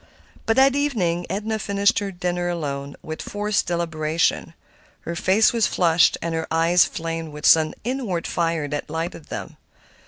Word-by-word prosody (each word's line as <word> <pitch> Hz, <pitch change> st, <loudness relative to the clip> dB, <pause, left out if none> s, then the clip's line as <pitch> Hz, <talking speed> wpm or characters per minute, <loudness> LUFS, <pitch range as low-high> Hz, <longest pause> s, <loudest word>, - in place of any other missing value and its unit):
But 225 Hz, -, +3 dB
that 265 Hz, +1 st, +5 dB
evening 190 Hz, -12 st, 0 dB
Edna 215 Hz, +2 st, -2 dB
finished 200 Hz, 0 st, +2 dB
her 200 Hz, -1 st, -3 dB
dinner 175 Hz, -1 st, -2 dB
alone, 140 Hz, -4 st, -4 dB
with 155 Hz, 0 st, -6 dB
forced 205 Hz, 0 st, -1 dB
deliberation. 165 Hz, -1 st, -1 dB, 0.5 s
Her 170 Hz, -, -5 dB
face 195 Hz, +7 st, +3 dB
was 230 Hz, -2 st, +2 dB
flushed 170 Hz, -2 st, +3 dB
and 170 Hz, 0 st, -2 dB
her 160 Hz, 0 st, -2 dB
eyes 165 Hz, +2 st, +4 dB
flamed 165 Hz, -1 st, -4 dB
with 150 Hz, +1 st, -6 dB
some 155 Hz, -1 st, +5 dB
inward 230 Hz, -9 st, -2 dB
fire 165 Hz, -3 st, -1 dB
that 145 Hz, +1 st, -4 dB
lighted 165 Hz, 0 st, -4 dB
them. 105 Hz, -4 st, -7 dB
170 Hz, 155 wpm, -23 LUFS, 160-200 Hz, 0.5 s, that